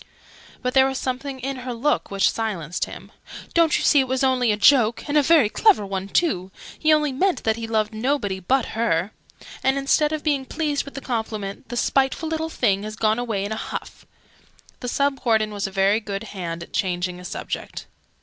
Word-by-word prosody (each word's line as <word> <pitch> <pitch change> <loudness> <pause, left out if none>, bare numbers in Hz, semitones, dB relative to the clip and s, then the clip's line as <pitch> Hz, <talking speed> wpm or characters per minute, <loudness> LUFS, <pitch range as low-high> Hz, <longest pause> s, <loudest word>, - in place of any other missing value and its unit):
But 250 0 -1
there 265 0 +6
was 265 -1 -2
something 265 +1 -4
in 270 +1 -4
her 250 -1 -5
look 290 +6 0
which 195 -1 +2
silenced 185 -8 -2
him. - - -11 0.4
"Don't 335 -2 +4
you - - -2
see 290 - +5
it 265 - +2
was 260 +1 0
only 255 -3 +3
a 210 - 0
joke? 235 +1 +4
And 290 - -2
a 300 - +6
very 300 -4 +5
clever 375 - +3
one, 195 0 -4
too! 190 - 0 0.3
He 315 - +3
only 300 -2 +3
meant 365 +8 0
that 220 -1 +2
he 230 0 -5
loved 220 -1 0
nobody 215 -4 -1
but 255 +7 +1
her! 210 -4 0 0.5
And, 265 +1 +2
instead 285 +2 +2
of 310 -1 -3
being 285 -3 +1
pleased 300 -3 -1
with 280 - -11
the 275 - -5
compliment, 220 -5 -4
the 240 - -4
spiteful 270 +6 +1
little 320 0 -2
thing 200 -10 +1
has 215 +1 -6
gone 220 +1 +1
away 220 -5 -2
in 205 - -5
a - - -1
huff!" - - -7 0.7
The 250 - -5
Sub 280 +2 0
Warden 220 -3 +2
was 200 -1 -2
a - - -8
very 195 +2 +3
good 200 -2 -5
hand 170 -3 -5
at - - -15
changing 180 -2 -1
a - - -11
subject. 180 - -5
240 Hz, 205 wpm, -23 LUFS, 205-275 Hz, 0.7 s, there